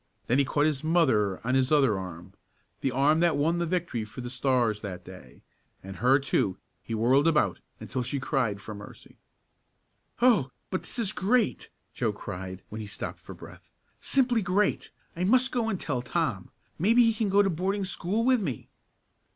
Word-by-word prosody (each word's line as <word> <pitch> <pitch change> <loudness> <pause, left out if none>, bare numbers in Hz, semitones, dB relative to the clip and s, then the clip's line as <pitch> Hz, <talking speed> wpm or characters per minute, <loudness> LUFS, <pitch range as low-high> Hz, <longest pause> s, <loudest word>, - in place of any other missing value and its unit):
Then 125 +4 +2
he 140 - +4
caught 145 +3 +1
his 150 -2 0
mother 130 - +2
on 125 - 0
his 130 +1 +2
other 135 -8 +4
arm 90 -1 -7 0.5
the 135 - 0
arm 140 +5 +3
that 170 -2 +3
won 165 +4 +1
the 170 - -1
victory 165 -10 -2
for 110 +4 -9
the 120 0 -6
Stars 125 -4 +1
that 90 -3 -7
day 90 -9 -13 0.4
and 95 -1 -8
her, 125 +6 +4
too, 135 -9 0 0.2
he 115 - -5
whirled 130 +7 +3
about 150 - +2 0.2
until 130 - -4
she 130 +3 -2
cried 125 -7 -1
for 110 +2 -8
mercy. 100 0 -12 1.0
"Oh, 230 - +4 0.2
but 185 - -1
this - - -7
is 220 -4 0
great!" 215 +4 0 0.2
Joe 115 -4 -1
cried 95 -2 -7
when 110 +1 -6
he 105 - -7
stopped 105 - -6
for - - -11
breath. - - -14 0.3
"Simply 245 -4 +2
great! 195 +2 0 0.3
I 175 - -2
must 255 +6 +4
go 235 -3 0
and 195 -4 -2
tell 130 -5 -2
Tom. 120 - -2 0.3
Maybe 230 +8 +5
he 225 -1 +3
can 215 -1 -1
go 200 +1 +5
to 195 - +1
boarding 190 +4 -1
school 195 +4 -1
with 255 -3 +3
me." 140 - -4
140 Hz, 185 wpm, -27 LUFS, -, 1.0 s, Maybe